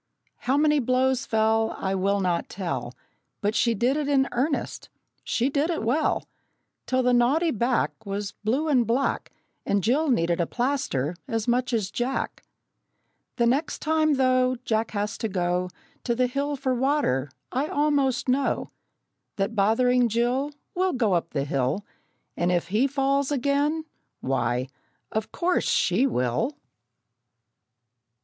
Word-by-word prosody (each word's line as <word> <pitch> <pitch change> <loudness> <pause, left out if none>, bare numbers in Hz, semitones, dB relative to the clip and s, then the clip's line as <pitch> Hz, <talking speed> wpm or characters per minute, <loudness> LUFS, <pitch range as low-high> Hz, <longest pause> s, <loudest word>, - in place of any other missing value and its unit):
How 265 +2 +3
many 300 0 +4
blows 260 +1 +1
fell 220 0 +2
I 190 0 -2
will 200 +1 +1
not 180 -2 -1
tell, 135 -10 -4 0.4
But 205 +1 0
she 235 0 +2
did 245 +7 +1
it 300 -2 -1
in 275 -2 +3
earnest, 280 +5 -2 0.3
she 245 - 0
did 285 +3 0
it 330 -9 -1
well, 265 +8 0 0.6
Till 260 0 +1
the 250 0 +3
naughty 280 +8 +3
back 240 +3 +1
Was 200 0 -4
blue 260 +9 +1
and 255 -6 +3
black, 255 +4 0 0.3
And 200 -2 0
Jill 285 +7 +2
needed 170 -7 +2
a 170 - 0
plaster 240 - -1
as 225 -3 -2
much 245 +1 +1
as 215 -4 -1
Jack! 245 +4 -2 0.9
The 235 - +2
next 275 +7 +1
time, 310 -1 +2
though, 255 -1 +3
Jack 220 0 0
has 205 0 -3
to 225 - -1
go 180 -1 0 0.4
To 235 - +1
the 250 +1 +2
hill 280 +3 -1
for 260 -1 -1
water, 255 - +1 0.2
I 270 +4 0
almost 285 -4 +1
know 265 +2 0 0.6
That 195 +3 -1
bothering 240 +4 +3
Jill 245 +5 +1 0.2
Will 370 +1 +1
go 230 -7 +1
up 170 -1 0
the 140 -3 -2
hill, 140 +7 -1 0.5
And 175 +1 +1
if 175 0 0
he 220 +8 +2
falls 275 0 0
again, 285 +3 +1 0.3
why, 125 -1 -1 0.4
of 220 0 -3
course 360 +1 0
she 210 +10 +3
will! 225 - -1
245 Hz, 145 wpm, -25 LUFS, 200-275 Hz, 0.9 s, many